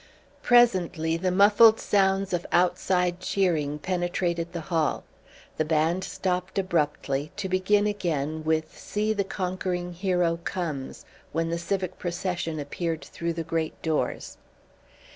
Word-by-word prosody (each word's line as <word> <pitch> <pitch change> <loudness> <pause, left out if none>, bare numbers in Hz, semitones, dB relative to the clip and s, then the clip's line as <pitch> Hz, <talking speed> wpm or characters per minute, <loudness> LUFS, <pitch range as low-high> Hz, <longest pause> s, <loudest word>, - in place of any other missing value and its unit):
Presently 180 -9 +3
the 185 +2 0
muffled 205 +4 +6
sounds 195 -1 +1
of 175 -1 0
outside 180 0 +2
cheering 165 -7 0
penetrated 175 0 -1
the 170 -2 -4
hall. 160 -3 +1 0.5
The - - +2
band 160 +4 +1
stopped 180 0 -2
abruptly, 150 -5 0
to 205 -2 -2
begin 190 +3 +2
again 160 -7 -2
with 160 0 -1
"See 215 +1 -1
the 200 -2 0
Conquering 180 -2 -3
Hero 180 -2 +1
Comes" 155 -8 -4 0.3
when 165 +1 0
the 170 - -1
civic 185 +1 -3
procession 175 -2 -3
appeared 160 +3 -3
through 170 0 -3
the 165 0 -3
great 160 0 -2
doors. 160 -2 -2
175 Hz, 125 wpm, -26 LUFS, 160-190 Hz, 0.5 s, muffled